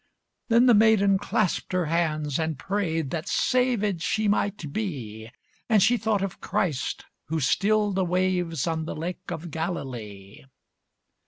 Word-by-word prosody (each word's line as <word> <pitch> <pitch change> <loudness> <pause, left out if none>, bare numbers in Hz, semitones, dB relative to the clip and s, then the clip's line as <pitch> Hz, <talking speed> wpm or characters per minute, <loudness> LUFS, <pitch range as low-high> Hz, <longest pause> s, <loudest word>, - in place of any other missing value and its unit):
Then 235 +1 +5
the 245 - +6
maiden 205 -3 +4
clasped 205 -2 -1
her 180 -2 +1
hands 155 -3 0
and 160 -2 -1
prayed 165 -7 -2
That 160 -2 -3
saved 235 -8 +1
she 215 +4 0
might 200 -7 -1
be; 115 - -5 0.4
And 215 -4 +5
she 240 +3 +4
thought 215 -3 0
of 195 - -5
Christ, 155 -9 -2 0.2
who 160 +1 -2
stilled 205 +8 +2
the 190 0 +1
wave, 180 -3 0
On 160 -1 -1
the - - -5
Lake 175 +3 -5
of 165 +1 -6
Galilee. 120 - -6
180 Hz, 145 wpm, -26 LUFS, 155-205 Hz, 0.4 s, the